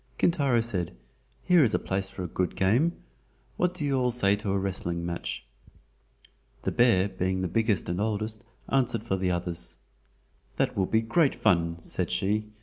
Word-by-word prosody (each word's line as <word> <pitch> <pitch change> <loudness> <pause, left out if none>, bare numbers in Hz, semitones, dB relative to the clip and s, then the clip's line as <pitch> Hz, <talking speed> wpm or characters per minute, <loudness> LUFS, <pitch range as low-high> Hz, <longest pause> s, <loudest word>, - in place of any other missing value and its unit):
Kintaro 140 -8 +3
said, 90 - -1 0.5
"Here 175 -4 +5
is 110 -5 +2
a - - +4
place 95 0 -2
for 95 - -6
a - - -3
good 90 +1 -2
game. 120 - +3 0.6
What 180 0 0
do 155 - -3
you 135 -2 +1
all 125 -1 +2
say 100 -5 +2
to 105 0 -4
a 100 - +1
wrestling 85 -3 -2
match?" 85 0 -4 1.2
The - - 0
bear 115 -6 +4
being 95 -1 -2
the 90 - 0
biggest 110 0 +1
and 85 +2 -2
the - - +1
oldest, 110 0 -2 0.2
answered 125 -5 +1
for 95 - -1
the 95 -1 0
others: 85 -7 -2 0.8
"That - - 0
will 95 -2 +1
be 110 - +2
great 135 +6 +2
fun," 85 -5 +2
said 85 - -3
she. 105 +2 0
100 Hz, 180 wpm, -27 LUFS, 90-120 Hz, 1.2 s, Here